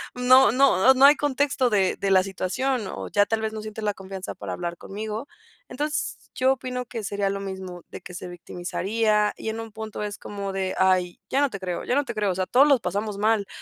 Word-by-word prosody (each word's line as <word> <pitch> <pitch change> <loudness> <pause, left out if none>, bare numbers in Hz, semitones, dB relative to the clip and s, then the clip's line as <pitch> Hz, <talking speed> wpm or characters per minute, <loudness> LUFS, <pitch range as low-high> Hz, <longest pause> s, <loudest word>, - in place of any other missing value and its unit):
no 250 -1 +6
no 265 -1 +5
no 270 +1 +7
hay 290 - +8
contexto 280 -3 +1
de 195 -4 +2
de 195 -1 -1
la 185 -1 +5
situación, 200 +5 -2
o - - -6
ya 205 0 +3
tal 225 +1 -1
vez 220 0 -2
no 215 - -5
sientes 215 0 -7
la 210 -1 +1
confianza 190 0 -7
para - - -6
hablar 175 -1 -4
conmigo". 215 +7 -6 0.4
Entons 295 +2 -3
yo 260 +1 +3
opino 250 -1 -5
que 230 -2 -6
sería 200 0 -1
lo 200 0 -2
mismo 190 -2 -7
de - - -9
que 180 - -10
se 180 - -6
victimizaría, 210 +5 -1
y 220 - -4
en 220 - -4
un 225 - -9
punto 220 -1 -6
es 205 -1 -4
como 200 -1 -6
de: 190 -1 -2
"Ay, 185 -2 +2
ya 275 - +2
no 285 - +3
te 200 - -6
creo, 180 -2 -4
ya 250 - 0
no 285 0 +2
te - - -5
creo. 205 -3 +1
O - - -3
sea, 185 0 -1
todos 275 +4 +5
los 275 -3 +5
pasamos 200 +3 -3
mal, 215 -1 +2
210 Hz, 235 wpm, -25 LUFS, 190-250 Hz, 0.4 s, hay